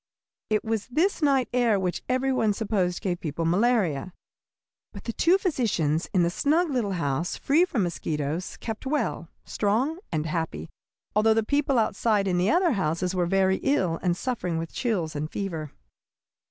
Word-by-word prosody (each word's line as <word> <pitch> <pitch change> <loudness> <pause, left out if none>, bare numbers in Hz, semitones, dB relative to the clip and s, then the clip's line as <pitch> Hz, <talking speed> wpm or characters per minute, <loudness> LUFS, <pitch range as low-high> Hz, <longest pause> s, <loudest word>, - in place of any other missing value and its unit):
It 215 -1 +1
was 220 -2 -2
this 330 +10 +1
night 275 -4 +3
air 235 -5 +3
which 180 -2 -2
every 260 +1 +1
one 220 -5 +2
supposed 200 -4 -1
gave 180 -4 -1
people 165 +1 -3
malaria. 185 - +1 0.8
But 200 - -9
the 230 - -4
two 350 - +4
physicians 210 - 0
in 180 -3 +3
the 170 - +1
snug 310 - +1
little 230 -7 0
house, 160 -1 -1
free 315 +6 +3
from 245 - -1
mosquitoes, 160 -1 -3
kept 225 +3 -6
well, 265 - -1 0.2
strong, 245 - 0
and 155 -2 -1
happy, 160 - -3 0.4
although 220 +1 +4
the 225 - +2
people 285 +2 +1
outside 215 -2 +1
in 180 -1 +1
the 185 +3 +2
other 350 0 +3
houses 180 - -1
were 180 -2 +1
very 190 +1 +2
ill 185 - 0
and 175 -1 0
suffering 185 -9 -2
with 165 0 -5
chills 185 -11 -1
and 150 +1 -3
fever. 165 -8 -4
200 Hz, 165 wpm, -26 LUFS, 170-250 Hz, 0.8 s, two